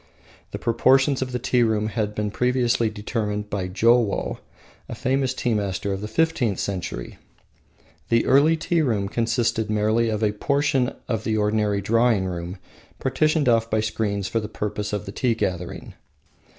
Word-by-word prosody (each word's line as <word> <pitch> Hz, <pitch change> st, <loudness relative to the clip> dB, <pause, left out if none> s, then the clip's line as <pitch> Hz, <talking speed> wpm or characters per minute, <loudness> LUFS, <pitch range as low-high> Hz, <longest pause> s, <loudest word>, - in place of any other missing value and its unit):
The -, -, -5 dB
proportions 135 Hz, +4 st, +3 dB
of 130 Hz, -1 st, -2 dB
the 125 Hz, -, -1 dB
tea 125 Hz, 0 st, +1 dB
room 110 Hz, -2 st, +1 dB
had 105 Hz, -2 st, -2 dB
been 105 Hz, -1 st, -2 dB
previously 125 Hz, -1 st, +1 dB
determined 105 Hz, -1 st, -3 dB
by 95 Hz, -3 st, -2 dB
Jowo 115 Hz, +3 st, +2 dB, 0.5 s
a -, -, -5 dB
famous 130 Hz, 0 st, 0 dB
tea 120 Hz, -2 st, 0 dB
master 100 Hz, -1 st, -1 dB
of 95 Hz, -, -4 dB
the 105 Hz, -, -4 dB
fifteenth 120 Hz, -, +1 dB
century. 90 Hz, -11 st, -4 dB, 0.9 s
The 115 Hz, 0 st, +3 dB
early 150 Hz, +5 st, +4 dB
tea 165 Hz, +1 st, 0 dB
room 110 Hz, -9 st, 0 dB
consisted 115 Hz, 0 st, 0 dB
merely 110 Hz, +2 st, +2 dB
of 110 Hz, 0 st, -2 dB
a 105 Hz, -, +3 dB
portion 140 Hz, +2 st, 0 dB
of 115 Hz, -4 st, -2 dB
the 110 Hz, -1 st, 0 dB
ordinary 105 Hz, -1 st, +1 dB
drawing 115 Hz, -1 st, +2 dB
room 90 Hz, +1 st, -5 dB, 0.4 s
partitioned 155 Hz, +2 st, +1 dB
off 115 Hz, -1 st, +3 dB
by 110 Hz, -, +1 dB
screens 105 Hz, -2 st, -2 dB
for 115 Hz, +4 st, 0 dB
the 105 Hz, -1 st, -6 dB
purpose 105 Hz, -1 st, -4 dB
of 105 Hz, 0 st, -3 dB
the 100 Hz, -, -6 dB
tea 120 Hz, +3 st, 0 dB
gathering. 90 Hz, -5 st, -4 dB
110 Hz, 165 wpm, -23 LUFS, 105-125 Hz, 0.9 s, early